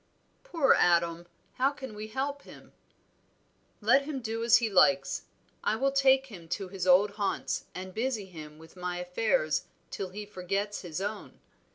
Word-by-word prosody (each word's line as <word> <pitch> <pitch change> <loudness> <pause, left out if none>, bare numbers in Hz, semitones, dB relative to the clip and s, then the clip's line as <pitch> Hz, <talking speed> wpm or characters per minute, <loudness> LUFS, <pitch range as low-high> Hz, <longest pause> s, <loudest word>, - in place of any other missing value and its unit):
"Poor 330 - +3
Adam! 170 0 +2 0.3
how 265 +2 +4
can 270 -4 -8
we 210 +1 -6
help 275 +5 -3
him?" - - -15 1.1
"Let 245 +6 +5
him 280 -1 -4
do 225 -1 -3
as 235 0 +7
he 230 - 0
likes. 185 -2 +3 0.4
I - - +2
will 270 +4 +1
take 270 -1 +4
him 185 -10 -11
to 195 -3 -7
his 185 -1 -4
old 190 +3 +6
haunts, 200 -2 -1
and 185 0 -7
busy 225 -2 -1
him 155 -4 -11
with 160 +2 -15
my 180 -1 -4
affairs 180 -3 0 0.3
till 195 -2 -4
he 205 +3 -7
forgets 200 +1 -3
his 175 -1 -5
own. 205 +1 -5
205 Hz, 165 wpm, -29 LUFS, 180-250 Hz, 1.1 s, as